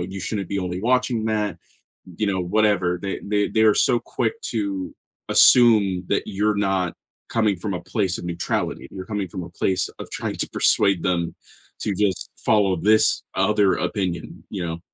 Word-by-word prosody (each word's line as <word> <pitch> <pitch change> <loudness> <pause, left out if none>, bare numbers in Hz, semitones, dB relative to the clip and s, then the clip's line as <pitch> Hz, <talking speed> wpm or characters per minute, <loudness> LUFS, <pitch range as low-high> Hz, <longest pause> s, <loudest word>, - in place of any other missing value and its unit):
you 95 +2 -5
shouldn't 100 -1 -3
be 100 - -2
only 90 -1 -3
watching 125 -1 +1
that." 105 -2 -1 0.6
You 110 - 0
know, 95 -2 0
whatever. 95 -1 +1
They 100 -1 -4
they 105 0 0
they 110 - +2
are 110 -1 +6
so 120 -2 +3
quick 450 - -3
to 100 -4 -3 0.3
assume 105 -7 +5
that - - 0
you're 105 +1 0
not 95 -3 0 0.4
coming 110 -4 +1
from 100 +3 -4
a 90 - -4
place 90 0 -1
of - - -8
neutrality, 85 0 -3
you're 95 -1 -8
coming 105 -3 -3
from 90 +1 -6
a 85 - -9
place 95 +2 -1
of - - -8
trying - - -4
to - - -1
persuade 100 -4 +3
them 85 -2 -1 0.5
to 105 - -1
just 95 -1 -1
follow 100 -4 +2
this 110 +5 +3
o 95 +1 +2
other 105 -3 +3
opinion, 90 -5 -4
you 95 -4 -4
know? 85 0 -4
100 Hz, 180 wpm, -22 LUFS, 90-105 Hz, 0.6 s, are